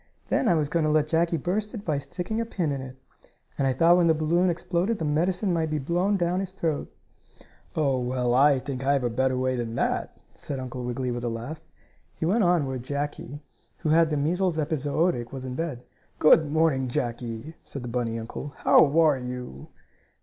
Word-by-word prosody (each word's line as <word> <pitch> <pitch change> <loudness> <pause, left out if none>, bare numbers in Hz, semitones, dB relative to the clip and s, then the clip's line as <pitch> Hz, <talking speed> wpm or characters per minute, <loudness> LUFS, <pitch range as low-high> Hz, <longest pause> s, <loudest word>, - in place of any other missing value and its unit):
Then 255 - +1
I 175 - +4
was 150 -2 +1
going 165 +2 0
to 155 - +2
let 150 -1 +3
Jackie 165 +2 +1
burst 205 - -2
it 205 - -7
by 150 -4 0
sticking 185 +9 -4
a - - +1
pin 175 -9 -2
in 135 -1 -3
it. 130 -1 -9 0.6
And 135 - 0
I 130 - +2
thought 170 +6 +5
when 175 -1 +4
the 160 - +4
balloon 170 +4 +2
exploded 175 +5 -1
the 160 - -3
medicine 180 +6 +1
might 160 -2 0
be 155 - -1
blown 175 +8 +1
down 175 0 0
his 190 -1 -4
throat." 160 -6 -2 0.8
"Oh, 140 -4 +1
well, 125 0 0
I 140 +2 +5
think 130 0 -5
I 140 +1 +3
have 140 -2 +1
a 120 - 0
better 130 +2 +1
way 130 0 0
than 115 -2 -3
that," - - -1
said 140 -2 -6
Uncle 130 -1 -6
Wiggily 125 +1 -2
with 120 0 -4
a 120 - -1
laugh. 120 +7 -6 0.5
He - - -3
went 210 +6 +2
in 175 -4 +3
where 130 -1 -3
Jackie, 145 +1 -5 0.4
who 155 - -1
had 165 +1 +4
the 150 - 0
measles 175 +4 0
epizootic, 150 -3 0
was 130 -1 -6
in 130 - -4
bed. 135 -4 -4 0.3
"Good 155 -1 +5
morning, 155 -5 +2
Jackie," 120 +3 -4
said 140 - -8
the - - -5
bunny 120 -1 -2
uncle. 120 +5 -6
"How - - +6 0.2
are 155 -5 +4
you?" 125 - -7
150 Hz, 210 wpm, -26 LUFS, 130-170 Hz, 0.8 s, How